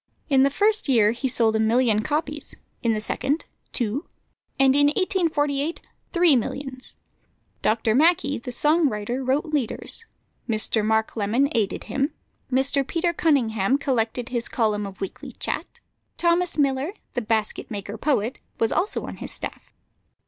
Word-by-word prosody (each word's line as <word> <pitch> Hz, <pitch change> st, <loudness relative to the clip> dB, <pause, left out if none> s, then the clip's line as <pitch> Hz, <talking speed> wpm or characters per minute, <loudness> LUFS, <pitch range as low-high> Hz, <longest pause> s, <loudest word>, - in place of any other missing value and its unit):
In 270 Hz, -2 st, +5 dB
the 275 Hz, -, +5 dB
first 415 Hz, +3 st, +1 dB
year 220 Hz, -5 st, +5 dB
he 240 Hz, +3 st, -2 dB
sold 225 Hz, -3 st, +2 dB
a -, -, +2 dB
million 220 Hz, -1 st, +3 dB
copies; 295 Hz, +3 st, -3 dB, 0.3 s
in 230 Hz, -3 st, +2 dB
the -, -, -1 dB
second, 285 Hz, +7 st, 0 dB, 0.3 s
two; 240 Hz, +3 st, -2 dB, 0.5 s
and 270 Hz, 0 st, +5 dB
in 285 Hz, 0 st, +5 dB
1848, 305 Hz, -3 st, 0 dB, 0.3 s
three 345 Hz, -4 st, +5 dB
millions. 260 Hz, +2 st, -4 dB, 0.7 s
Dr. 220 Hz, 0 st, +2 dB
Mackay, 290 Hz, 0 st, +3 dB
the 250 Hz, +2 st, -6 dB
song 300 Hz, +5 st, +3 dB
writer, 235 Hz, +4 st, -3 dB
wrote 265 Hz, +5 st, +1 dB
leaders; 295 Hz, -, -2 dB, 0.4 s
Mr. 215 Hz, 0 st, +2 dB
Mark 220 Hz, +1 st, +1 dB
Lemon 230 Hz, +6 st, +2 dB
aided 220 Hz, -4 st, 0 dB
him; 275 Hz, +6 st, -1 dB, 0.4 s
Mr. 270 Hz, +1 st, +1 dB
Peter 340 Hz, 0 st, 0 dB
Cunningham 255 Hz, -, +2 dB
collected 245 Hz, -3 st, -1 dB
his 240 Hz, -2 st, 0 dB
column 210 Hz, -3 st, 0 dB
of 195 Hz, -1 st, -11 dB
weekly 195 Hz, -, -6 dB
chat; 475 Hz, -, -4 dB, 0.4 s
Thomas 345 Hz, 0 st, +1 dB
Miller, 280 Hz, +4 st, +1 dB, 0.2 s
the 245 Hz, -, -1 dB
basket 220 Hz, -1 st, -1 dB
maker 205 Hz, -1 st, -5 dB
poet, 235 Hz, -1 st, 0 dB, 0.2 s
was 225 Hz, -, +2 dB
also 385 Hz, +4 st, 0 dB
on -, -, -7 dB
his -, -, -7 dB
staff. -, -, -6 dB
260 Hz, 150 wpm, -24 LUFS, 220-295 Hz, 0.7 s, In